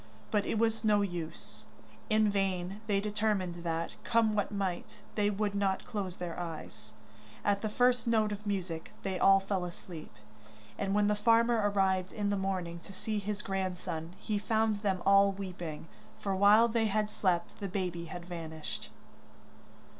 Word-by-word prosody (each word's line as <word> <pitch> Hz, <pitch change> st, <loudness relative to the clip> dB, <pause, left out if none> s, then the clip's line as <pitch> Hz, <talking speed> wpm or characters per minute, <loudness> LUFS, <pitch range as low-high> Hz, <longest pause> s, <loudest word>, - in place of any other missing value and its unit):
But 205 Hz, -2 st, +1 dB
it -, -, 0 dB
was 225 Hz, 0 st, +1 dB
no 210 Hz, -2 st, +4 dB
use. 175 Hz, -4 st, -6 dB, 0.4 s
In 215 Hz, -1 st, +4 dB
vain 195 Hz, 0 st, -1 dB
they 200 Hz, -2 st, +2 dB
determined 205 Hz, -4 st, -1 dB
that, 165 Hz, 0 st, -2 dB
come 225 Hz, -2 st, +3 dB
what 205 Hz, -1 st, 0 dB
might, 200 Hz, +1 st, -3 dB
they 205 Hz, -1 st, +2 dB
would 205 Hz, 0 st, -1 dB
not 195 Hz, -1 st, 0 dB
close 195 Hz, -4 st, -3 dB
their 175 Hz, -1 st, -5 dB
eyes; 165 Hz, -3 st, -7 dB, 0.5 s
at 200 Hz, -1 st, +2 dB
the 215 Hz, -, -1 dB
first 245 Hz, +1 st, +3 dB
note 220 Hz, -2 st, +3 dB
of 205 Hz, +1 st, -5 dB
music 180 Hz, -5 st, -3 dB
they 190 Hz, -2 st, -2 dB
all 195 Hz, 0 st, +7 dB
fell 195 Hz, -1 st, -2 dB
asleep, 175 Hz, -2 st, -8 dB, 0.6 s
and 195 Hz, 0 st, -1 dB
when 210 Hz, 0 st, +4 dB
the 210 Hz, -, +3 dB
farmer 230 Hz, +2 st, +4 dB
arrived 190 Hz, -2 st, +1 dB
in 205 Hz, -1 st, -1 dB
the -, -, +2 dB
morning 185 Hz, -3 st, -2 dB
to 195 Hz, -, -12 dB
see 210 Hz, +2 st, -3 dB
his 205 Hz, +1 st, -4 dB
grandson, 180 Hz, -3 st, -3 dB
he 210 Hz, +1 st, -2 dB
found 220 Hz, 0 st, +1 dB
them 190 Hz, -4 st, 0 dB
all 195 Hz, 0 st, +6 dB
weeping, 175 Hz, -5 st, -6 dB, 0.3 s
for 195 Hz, -1 st, -1 dB
while 205 Hz, +4 st, +7 dB
they 225 Hz, -1 st, +1 dB
had 210 Hz, 0 st, 0 dB
slept 180 Hz, -5 st, 0 dB
the 200 Hz, -, -3 dB
baby 180 Hz, -3 st, -2 dB
had 175 Hz, +1 st, -7 dB
vanished. 160 Hz, -3 st, -6 dB
195 Hz, 165 wpm, -32 LUFS, 180-210 Hz, 0.6 s, all